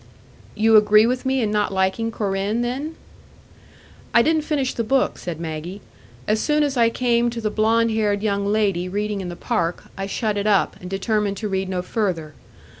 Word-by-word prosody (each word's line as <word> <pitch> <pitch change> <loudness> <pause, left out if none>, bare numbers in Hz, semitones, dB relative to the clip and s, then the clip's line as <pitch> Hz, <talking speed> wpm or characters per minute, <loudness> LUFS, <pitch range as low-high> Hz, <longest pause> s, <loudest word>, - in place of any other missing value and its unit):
"You 220 0 +5
agree 210 +1 +6
with 250 +2 -1
me 265 0 +1
in 210 - 0
not 210 -1 0
liking 190 +4 0
Corinne, 200 +2 -1
then?" 275 +7 -3 1.2
"I 235 - +7
didn't 315 +2 +2
finish 295 -4 -1
the 230 - -2
book," 265 +4 +1
said 170 -3 -5
Maggie. 165 +4 -5 0.5
"As 215 +1 +2
soon 300 0 +2
as 285 -2 -1
I 230 -2 +4
came 240 0 +1
to 235 0 -5
the 215 -2 -2
blond 225 +1 +2
haired 210 -2 0
young 200 -2 0
lady 200 -4 +1
reading 205 +1 -2
in 180 - -5
the 175 - -6
park, 170 0 -2
I 195 0 -4
shut 210 0 -1
it 200 +1 -1
up, 200 -3 +2
and 180 - -7
determined 200 +1 -1
to 215 - -3
read 190 -1 -2
no 180 -1 -2
further. 180 -7 -2
210 Hz, 190 wpm, -22 LUFS, 195-235 Hz, 1.2 s, I